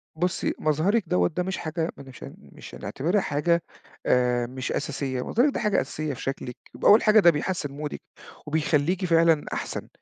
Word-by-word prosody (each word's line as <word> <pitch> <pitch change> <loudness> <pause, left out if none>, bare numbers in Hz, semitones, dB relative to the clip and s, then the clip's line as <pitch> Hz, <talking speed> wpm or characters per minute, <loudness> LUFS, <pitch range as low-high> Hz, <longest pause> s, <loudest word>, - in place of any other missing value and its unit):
بُصّي 180 +3 -1
مظهرِك 170 +9 +1
دوّة 90 -1 +3
ده 180 - -2
مش 190 +1 -3
حاجة 160 +1 -3
ما 140 - -10
نشان 130 -2 -11
مش - - -13
هنعتبِرها 180 +8 -1
حاجة 170 +4 +1 0.4
آآ 125 -1 +2
مش 130 +1 -5
أساسية. 135 -3 -2
مظهرِك 265 +5 +2
ده - - -2
حاجة 210 -1 +2
أساسية 150 +2 -4
في 125 - -9
شكلِك 130 -2 -5 0.2
ب - - -7
أول 210 +3 +7
حاجة 215 0 +6
ده 175 - +7
بيحسن 150 -1 -3
مودِك 150 +1 -6 0.5
وبيخلِّيكِ 160 +4 +1
فعلًا 165 -2 +3
أحسن. - - -4
155 Hz, 175 wpm, -25 LUFS, 135-180 Hz, 0.5 s, أول